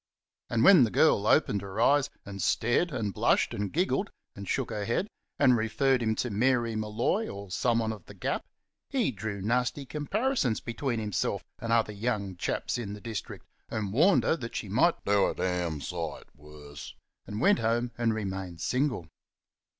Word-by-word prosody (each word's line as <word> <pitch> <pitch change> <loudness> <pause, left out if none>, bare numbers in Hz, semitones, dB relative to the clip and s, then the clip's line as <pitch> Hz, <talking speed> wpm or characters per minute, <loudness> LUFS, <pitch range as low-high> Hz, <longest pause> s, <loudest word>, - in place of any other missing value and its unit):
And 115 -1 +1
when 180 -5 +8
the 115 - +2
girl 95 - +3
opened 100 - +3
her 100 +2 -6
eyes 140 +4 +4 0.2
and 100 -1 -6
stared 120 +10 +1
and 110 -7 -2
blushed - - +2
and 100 -1 -3
giggled, 190 +4 0 0.3
and 100 -1 -8
shook 130 -3 -1
her 105 -2 -3
head, 120 - 0 0.3
and 125 - +5
referred 125 +4 +1
him 110 -1 +1
to 120 +1 -2
Mary 120 +1 +1
Molloy 110 - 0
or 100 -1 -8
someone 115 +1 +1
of 105 -6 -12
The - - -11
Gap, - - -2 0.5
he 255 - +1
drew 100 -2 -5
nasty 125 +5 0
comparisons 155 - 0
between 120 0 -3
himself 105 -3 -1 0.2
and 115 - -4
other 115 -2 +2
young 100 -3 -2
chaps 90 - -2
in 105 -4 -5
the 105 - -8
district, 115 -1 -6 0.2
and 105 -3 -3
warned 170 - +5
her - - +2
that 120 -5 -7
she 105 - -4
might 135 - +2
"do 100 -1 +3
a - - -3
d - - -3
n 90 -4 -1
sight 85 +2 -4
worse," 75 0 -11 0.3
and 105 - -5
went 200 - +4
home 120 +2 0
and 115 -2 +1
remained 95 -4 -4
single. 125 - -1
110 Hz, 180 wpm, -29 LUFS, 100-130 Hz, 0.5 s, when